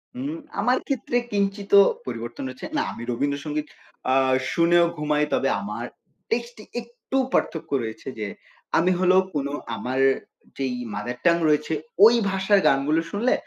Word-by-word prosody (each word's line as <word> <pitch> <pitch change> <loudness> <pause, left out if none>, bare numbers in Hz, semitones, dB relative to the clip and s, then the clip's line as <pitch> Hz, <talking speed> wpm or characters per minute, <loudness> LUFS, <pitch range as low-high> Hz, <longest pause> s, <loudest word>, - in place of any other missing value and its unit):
হুম, 275 +5 -4 0.2
আমার 245 +5 +3
ক্ষেত্রে 265 -3 -2 0.2
কিঞ্চিৎও 200 0 +4 0.2
পরিবর্তন 120 0 -5
হচ্ছে। 130 - -8
না - - +2
আমি - - -9
রবীন্দ্র 140 +3 -1
সংগীত 150 0 -3 0.4
আ - - +4 0.4
শুনেও 170 +1 +4
ঘুমাই। 150 0 +1
তবে 135 - +2
আমার 105 +4 -5 0.4
টেস্টে 235 -1 -3 0.2
একটু 240 +3 -5 0.2
পার্থক্য 160 - -1
রয়েছে 110 +3 -7
যে 105 - -2 0.5
আমি 175 +3 +3
হলো 185 0 +4 0.2
কোন 140 -1 0 0.3
আমার 130 +3 -3 0.6
যেই 135 -2 -1 0.2
মাদার 120 +5 -4
টাং 170 -1 +6
রয়েছে 150 +1 +1 0.3
ওই 230 +2 +7
ভাষার 195 +1 +3
গানগুলো 140 +4 +3
শুনলে 230 +5 +2
165 Hz, 145 wpm, -24 LUFS, 135-205 Hz, 0.6 s, ওই